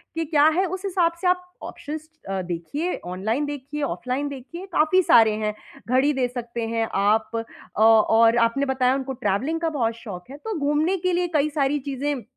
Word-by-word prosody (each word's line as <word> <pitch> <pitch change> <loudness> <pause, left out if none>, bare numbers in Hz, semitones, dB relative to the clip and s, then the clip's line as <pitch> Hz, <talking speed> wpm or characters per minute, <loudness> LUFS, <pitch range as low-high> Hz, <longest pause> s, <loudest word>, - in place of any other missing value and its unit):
कि 330 0 -1
क्या 295 -1 +3
है, 380 - +3
उस 375 +2 -5
हिसाब 350 -3 +1
से 370 - +1
आप 360 0 +2 0.2
ऑप्शंस 310 +2 -7 0.2
अ, 195 -1 -1
देखिए, 180 - -3
ऑनलाइन 220 +10 -2
देखिए, 290 +1 -5
ऑफलाइन 265 +1 -2
देखिए, 285 +7 -8
काफ़ी 335 +4 +4
सारे 225 -8 +6
हैं। 210 - 0 0.4
घड़ी 260 +4 +3
दे 260 -2 0
सकते 240 -2 -5
हैं 225 0 -1
आप 210 +3 +2 0.5
अ, 215 - +1
और 225 +1 +5
आपने 275 +5 -2
बताया 260 -1 +2
उनको 265 0 -3
ट्रैवलिंग 265 - -1
का 330 - +1
बहुत 230 -1 +1
शौक 190 -4 -9
है, 285 - -8
तो 435 +3 -5
घूमने 300 +6 +1
के 365 - +1
लिए 355 0 +1
कई 300 +1 +3
सारी 290 -1 0
चीज़ें 275 -2 -2
275 Hz, 190 wpm, -24 LUFS, 230-310 Hz, 0.5 s, सारे